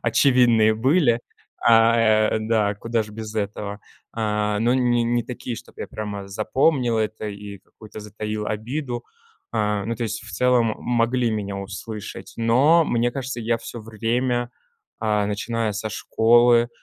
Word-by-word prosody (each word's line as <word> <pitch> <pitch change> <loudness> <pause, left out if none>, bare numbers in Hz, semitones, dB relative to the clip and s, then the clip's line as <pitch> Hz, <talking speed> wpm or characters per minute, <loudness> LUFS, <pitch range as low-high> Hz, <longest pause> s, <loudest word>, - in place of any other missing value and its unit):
очевидные 120 -5 +4
были. 125 0 +3 0.4
А, 115 0 +6 0.4
э, - - +1
да 110 -2 +1
куда 115 +2 -1
ж 105 - -12
без 110 0 -7
этого, 100 -1 -3 0.3
а, 105 -2 -1
но 120 +3 +2
не 120 -2 +2
не 120 +1 +1
такие, 125 0 -6
чтобы - - -12
я - - -5
прямо 100 -2 -6
запомнил 120 +4 +1
это 110 0 -2
и 100 0 -8
какую-то 110 +3 -13
затаил 105 0 -5
обиду. 120 +4 -4 0.5
А, 105 -2 0
ну 115 +3 -2
то 115 - -5
есть, 110 -1 -3
в 110 - -10
целом, 125 -3 +2
могли 120 0 +1
меня 100 -2 -3
услышать. 100 +2 -7
Но, 130 +9 +4
мне 120 -3 0
кажется, 130 -1 -4
я 115 +1 0
всё 115 +1 -8
время, 120 +3 -1 0.5
а, 105 -2 +1
начиная 110 +2 -2
со 105 +2 -4
школы, 120 +2 +4
115 Hz, 150 wpm, -23 LUFS, 105-120 Hz, 0.5 s, А